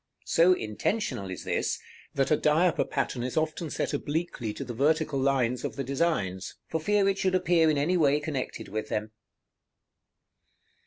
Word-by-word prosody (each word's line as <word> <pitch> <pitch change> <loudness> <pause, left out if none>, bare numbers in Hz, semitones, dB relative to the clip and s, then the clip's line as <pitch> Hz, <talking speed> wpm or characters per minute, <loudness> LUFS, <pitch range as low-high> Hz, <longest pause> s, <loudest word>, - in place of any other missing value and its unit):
So 175 +3 +5
intentional 110 - -2
is 95 - -6
this, - - -1 0.4
that 135 +1 +1
a - - +7
diaper 160 +4 +3
pattern 135 -3 -2
is 125 +4 -3
often 155 +1 -1
set - - -2
obliquely 145 -5 -2
to - - -4
the 125 -2 -6
vertical 150 +3 +1
lines 130 -2 +1
of - - -3
the 140 - -3
designs, 125 - -1
for 160 - -2
fear 205 +3 +2
it 195 0 +1
should 185 -1 +2
appear 175 -3 +3
in 150 - +2
any 165 +6 +2
way 145 -3 +4
connected 150 -4 -4
with 110 +2 -4
them. 105 0 -2
145 Hz, 165 wpm, -28 LUFS, 125-165 Hz, 0.4 s, a